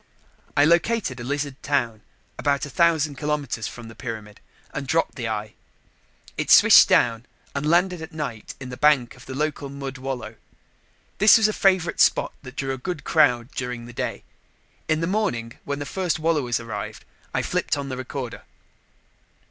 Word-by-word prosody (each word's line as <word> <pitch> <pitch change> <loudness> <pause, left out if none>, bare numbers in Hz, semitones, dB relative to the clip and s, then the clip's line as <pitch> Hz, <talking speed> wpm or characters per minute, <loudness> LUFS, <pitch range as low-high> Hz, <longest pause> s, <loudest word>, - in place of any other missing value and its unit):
I 145 - +6
located 170 - +2
a - - -6
lizard 145 +1 -3
town 120 -6 -1 0.4
about 140 +1 +1
a 145 - -9
thousand 155 -3 +2
kilometers 145 -7 -2
from 120 -2 -9
the 115 - -10
pyramid 110 -4 -7 0.3
and 140 -1 -4
dropped 165 +4 +1
the 120 -4 -4
eye. 110 0 -4 0.9
It - - -2
swished - - +8
down 115 0 +3 0.3
and 140 +2 -1
landed 175 +1 +2
at 160 - -8
night 140 -9 -6
in 130 -1 -7
the 125 - -7
bank 145 -5 +3
of 125 -1 -16
the 130 - -6
local 150 -1 -2
mud 135 -1 -6
wallow. 125 -4 -5 0.8
This 210 +3 +8
was 220 -1 +4
a 215 - -1
favorite 185 -5 +2
spot - - +3
that 125 -3 -11
drew 135 -1 -2
a 130 - -6
good 155 +3 -4
crowd 125 -5 +3
during 125 -2 -5
the 120 - -11
day. - - -4 0.6
In 155 0 +1
the - - +1
morning, 165 - -2
when 140 0 -2
the 145 - -5
first 180 +1 -1
wallowers 150 -7 0
arrived, 115 -3 -6 0.3
I - - -1
flipped - - -1
on 140 -1 -4
the 130 - -4
recorder. 130 -1 -6
140 Hz, 175 wpm, -24 LUFS, 120-155 Hz, 0.9 s, swished